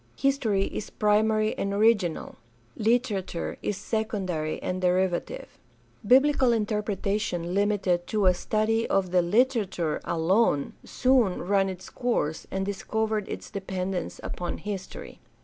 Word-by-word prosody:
History 235 -8 +1
is 205 - -5
primary 215 +1 +2
and 200 - -1
original; 205 -5 +1 0.4
literature 215 -6 -1
is 205 - -2
secondary 195 -7 -2
and 185 0 -2
derivative. 185 - -1 0.4
Biblical 260 +2 +4
interpretation 205 -4 -1
limited 195 -3 +1
to 210 -2 0
a 185 - +6
study 215 +5 0
of 190 -2 +1
the 180 -1 +4
Hterature 195 - +1
alone 165 -2 +1
soon 250 -9 +2
ran 195 +1 +2
its 185 -1 -8
course 235 - -1
and 190 0 -2
discovered 215 +1 -2
its - - -7
dependence 190 -2 -4
upon 175 -1 -4
history. 195 -2 -7
200 Hz, 115 wpm, -26 LUFS, 185-220 Hz, 0.4 s, a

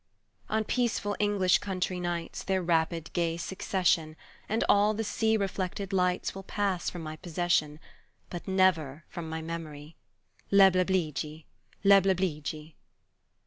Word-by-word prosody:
On 220 0 +1
peaceful 225 -3 0
English 200 -3 +3
country 185 -2 -2
nights 175 -1 -3
Their 190 -1 -1
rapid 165 -1 0
gay 170 -1 0
succession 170 -3 0 0.3
And 220 +2 +1
all 210 +1 +4
the 225 - -2
sea 220 +1 +1
reflected 195 0 -3
lights 180 -1 +1
Will 195 - -7
pass 195 -2 -1
from 175 -2 -7
my 155 0 -6
possession, 160 -3 0 0.5
But 175 +1 -7
never 170 -6 +2
from 165 -2 -6
my 160 0 -4
memory, 160 -2 -7 0.5
Leblebidji! 185 -5 +3 0.4
leblebidji! 180 -6 +2
180 Hz, 120 wpm, -29 LUFS, 160-195 Hz, 0.5 s, all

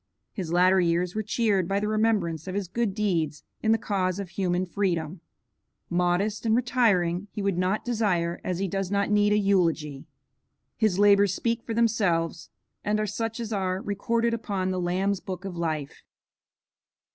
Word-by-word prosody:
His 180 -6 -4
latter 185 +2 +4
years 175 +1 +1
were 215 - -1
cheered 210 -4 +1
by 195 +2 0
the 210 - -2
remembrance 210 -8 0
of 185 - -4
his 200 -2 -2
good 205 +1 -1
deeds 165 -8 -1 0.2
in 220 - +2
the 225 - +4
cause 190 -4 -1
of 200 -3 -5
human 180 0 -1
freedom. 175 -3 -2 0.7
Modest 180 +4 +1
and 225 -1 +2
retiring, 210 -7 +2
he 210 -1 -5
would 200 -2 +1
not 185 +3 0
desire, 195 -8 0
as 180 - -2
he 195 +1 -1
does 195 0 -2
not 200 +1 0
need, 205 0 +3
a 210 - +4
eulogy. 165 -8 +1 0.7
His 215 -5 +1
labors 200 -1 +5
speak 230 0 -1
for 225 - -5
themselves, 200 -8 +1 0.3
and 210 0 0
are 215 - 0
such 225 +3 -3
as 230 -1 -4
are 190 -2 -1
recorded 230 +4 0
upon 200 -5 -2
the 185 -1 -2
Lamb's 185 +3 0
Book 185 0 -7
of 190 -2 -5
Life. 155 -4 -3
195 Hz, 170 wpm, -26 LUFS, 175-215 Hz, 0.7 s, labors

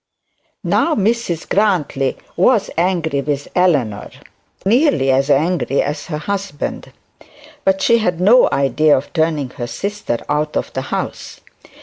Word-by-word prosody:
Now 330 - +1
Mrs 210 -5 -1
Grantly 175 -10 0 0.2
was 205 +3 +2
angry 165 -4 0
with 145 0 -3
Eleanor, 140 - +1 0.6
nearly 215 - +3
as 135 +2 +1
angry 150 -1 +1
as 145 0 -4
her 150 - -3
husband; 195 -2 -4 0.7
but 190 0 +1
she 235 -1 +4
had 180 -6 -1
no 220 +7 +5
idea 145 +3 +3
of 135 - -6
turning 155 -5 0
her 120 -2 -6
sister 200 - -3
out 150 +1 -1
of - - -4
the - - -2
house. - - -5
165 Hz, 130 wpm, -18 LUFS, 140-195 Hz, 0.7 s, no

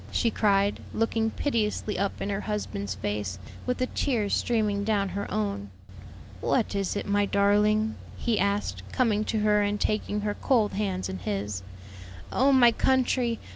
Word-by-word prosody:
she 230 - +1
cried, 200 -2 +2 0.2
looking 225 0 +1
piteously 215 -4 -1
up 200 +1 -2
in 205 - -2
her 200 +1 -2
husband's 100 - -3
face, 105 -1 -3 0.3
with 250 - 0
the 255 - +1
tears 235 -6 -1
streaming 210 -4 +1
down 200 -2 +1
her 200 +1 -4
own. 100 -1 -2 0.7
"What - - +1
is 200 -1 -1
it, 205 - -2
my 205 0 +2
darling?" 210 +2 +3 0.2
he 230 -2 0
asked, 200 +1 0
coming 220 -5 +2
to 220 -1 -1
her 210 0 +3
and 205 0 0
taking 210 -1 -1
her 205 0 -1
cold 225 -2 +1
hands 195 -2 -1
in 95 0 -5
his. 100 0 -3 0.7
"Oh 270 +2 +3
my 245 -3 +7
country! 250 -1 +1
210 Hz, 160 wpm, -27 LUFS, 195-225 Hz, 0.7 s, my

